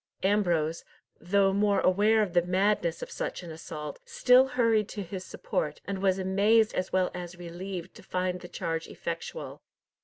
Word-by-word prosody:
Ambrose, 175 -6 +1 0.4
though 195 +2 +2
more 200 0 +3
aware 210 +4 +4
of 185 -4 -4
the 175 - +5
madness 180 -1 +1
of - - -8
such - - -4
an 170 - -8
assault, 155 -2 -7
still 255 +1 +5
hurried 230 -5 +2
to 205 - -5
his 185 +1 -6
support, 150 -4 -3
and 195 -1 -4
was 190 -1 +3
amazed 205 +4 +3
as 185 0 -2
well 185 -1 +2
as 175 0 -7
relieved 175 +1 -6
to - - -13
find 180 0 -2
the 175 - -8
charge 165 -2 -3
effectual. 170 - -6
185 Hz, 165 wpm, -28 LUFS, 175-205 Hz, 0.4 s, the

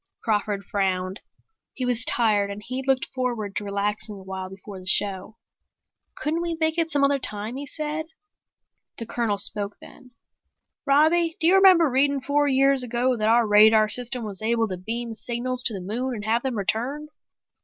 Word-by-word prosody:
Crawford 205 -2 -1
frowned. 190 0 -2 0.5
He 255 - -3
was 245 -2 +2
tired 210 -4 +2
and 200 +1 -7
he'd 255 +3 -5
looked 265 -1 +2
forward 240 -6 -3
to - - -3
relaxing 205 +1 -2
a 195 - -12
while 190 0 -6
before 195 0 -10
the 185 - -10
show. 200 +2 0 0.8
"Couldn't 315 +3 -2
we 340 -1 -3
make 320 +1 0
it 330 -1 0
some 285 -2 +1
other 280 0 +2
time," 215 0 -3
he 280 +1 -6
said. 310 +2 -4 0.9
The 230 - -6
Colonel 225 -3 -1
spoke 205 0 -1
then. 255 - -16 0.8
"Robbie, 320 +4 +3
do - - -1
you 350 - +5
remember 375 -4 +6
reading 280 +1 +1
four 290 +2 0
years 275 0 +3
ago 250 +1 0
that 215 -1 0
our 235 +1 +4
radar 215 +1 +5
system 245 +2 -3
was 205 -2 -6
able 225 0 +1
to 185 - -4
beam 230 +5 -5
signals 245 +3 0
to 230 - +6
the - - -5
moon 240 +7 -3
and 210 -1 -7
have 230 +2 +1
them 260 -3 -3
returned?" 255 +9 -2
235 Hz, 180 wpm, -24 LUFS, 205-275 Hz, 0.9 s, remember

